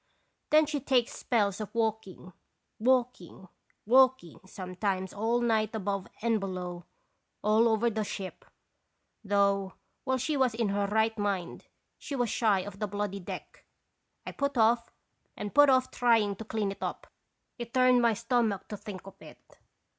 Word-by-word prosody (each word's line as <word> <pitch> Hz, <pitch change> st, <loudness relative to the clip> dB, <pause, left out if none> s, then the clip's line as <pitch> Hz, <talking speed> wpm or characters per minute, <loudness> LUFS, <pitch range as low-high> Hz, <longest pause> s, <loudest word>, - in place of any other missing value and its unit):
Then 310 Hz, 0 st, +5 dB
she 295 Hz, -1 st, -2 dB
takes 250 Hz, -2 st, +1 dB
spells 205 Hz, -4 st, 0 dB
of 215 Hz, -, -7 dB
walking, 220 Hz, -5 st, -3 dB, 0.5 s
walking, 240 Hz, -7 st, 0 dB, 0.4 s
walking 255 Hz, -6 st, +3 dB
sometimes 185 Hz, 0 st, -3 dB
all 230 Hz, +3 st, 0 dB
night 220 Hz, -2 st, +1 dB
above 200 Hz, -2 st, -3 dB, 0.2 s
and 230 Hz, -2 st, +2 dB
below, 180 Hz, -3 st, -5 dB, 0.6 s
all 215 Hz, +2 st, +4 dB
over 225 Hz, +1 st, +2 dB
the 220 Hz, -2 st, -1 dB
ship; 195 Hz, -2 st, -6 dB, 0.8 s
though, 200 Hz, -1 st, +1 dB, 0.3 s
while 260 Hz, 0 st, 0 dB
she 290 Hz, +5 st, -1 dB
was 260 Hz, -4 st, +2 dB
in 225 Hz, -3 st, 0 dB
her 200 Hz, 0 st, 0 dB
right 220 Hz, +2 st, +1 dB
mind, 200 Hz, -4 st, -3 dB, 0.3 s
she 280 Hz, -, -5 dB
was 245 Hz, -4 st, 0 dB
shy 210 Hz, -5 st, +2 dB
of 200 Hz, +1 st, -9 dB
the 210 Hz, -, -1 dB
bloody 205 Hz, 0 st, -3 dB
deck. 180 Hz, -, -9 dB, 0.6 s
I -, -, -5 dB
put 280 Hz, -1 st, -2 dB
off 230 Hz, +1 st, +3 dB, 0.5 s
and 205 Hz, -1 st, -5 dB
put 290 Hz, 0 st, +7 dB
off 260 Hz, -1 st, +3 dB
trying 225 Hz, -4 st, +2 dB
to 220 Hz, -, -8 dB
clean 210 Hz, -2 st, -2 dB
it 195 Hz, -, -10 dB
up; -, -, -4 dB, 0.5 s
it 235 Hz, -1 st, -6 dB
turned 255 Hz, -1 st, +4 dB
my 230 Hz, -2 st, +3 dB
stomach 230 Hz, -4 st, 0 dB
to 210 Hz, -, -5 dB
think 200 Hz, -3 st, -9 dB
of 195 Hz, -, -13 dB
it. -, -, -16 dB
220 Hz, 155 wpm, -29 LUFS, 200-240 Hz, 0.8 s, put